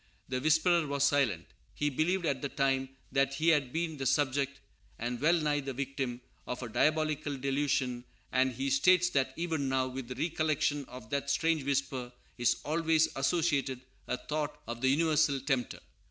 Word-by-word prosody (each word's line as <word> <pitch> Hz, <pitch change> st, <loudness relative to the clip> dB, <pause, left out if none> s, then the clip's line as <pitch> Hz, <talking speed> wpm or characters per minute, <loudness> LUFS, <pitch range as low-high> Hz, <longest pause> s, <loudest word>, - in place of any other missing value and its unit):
The 130 Hz, -1 st, -1 dB
whisperer 160 Hz, +2 st, +3 dB
was 140 Hz, -1 st, 0 dB
silent. 135 Hz, -, +2 dB, 0.3 s
He 145 Hz, 0 st, 0 dB
believed, 170 Hz, +6 st, 0 dB
at 135 Hz, -4 st, 0 dB
the 140 Hz, -, -2 dB
time, 135 Hz, -1 st, 0 dB, 0.2 s
that 135 Hz, 0 st, +1 dB
he 160 Hz, +4 st, +2 dB
had 145 Hz, -6 st, +2 dB
been 160 Hz, 0 st, -2 dB
the 135 Hz, -1 st, -1 dB
subject, 140 Hz, -1 st, +1 dB, 0.4 s
and 120 Hz, +1 st, -3 dB
well 170 Hz, +3 st, +4 dB
nigh 150 Hz, -2 st, +1 dB
the 135 Hz, -1 st, -4 dB
victim, 135 Hz, -2 st, -3 dB, 0.3 s
of 125 Hz, +1 st, -4 dB
a 120 Hz, -, -5 dB
diabolical 155 Hz, +3 st, +1 dB
delusion; 135 Hz, -2 st, 0 dB, 0.3 s
and 130 Hz, +1 st, +2 dB
he 275 Hz, -, -2 dB
states 185 Hz, -9 st, +4 dB
that, 135 Hz, -3 st, +1 dB
even 160 Hz, -5 st, -1 dB
now, 130 Hz, -1 st, +1 dB
with 130 Hz, -1 st, -6 dB
the 125 Hz, -, -6 dB
recollection 155 Hz, -3 st, 0 dB
of 125 Hz, -4 st, -11 dB
that 140 Hz, 0 st, -1 dB
strange 160 Hz, -1 st, +1 dB
whisper 135 Hz, -3 st, -1 dB, 0.3 s
is 120 Hz, -, +2 dB
always 160 Hz, +1 st, +2 dB
associated 140 Hz, -3 st, 0 dB, 0.3 s
a 125 Hz, -, -1 dB
thought 150 Hz, +1 st, -3 dB
of 120 Hz, 0 st, -5 dB
the 130 Hz, -, +3 dB
universal 155 Hz, -1 st, +3 dB
tempter. 130 Hz, -3 st, -1 dB
140 Hz, 170 wpm, -31 LUFS, 130-155 Hz, 0.4 s, well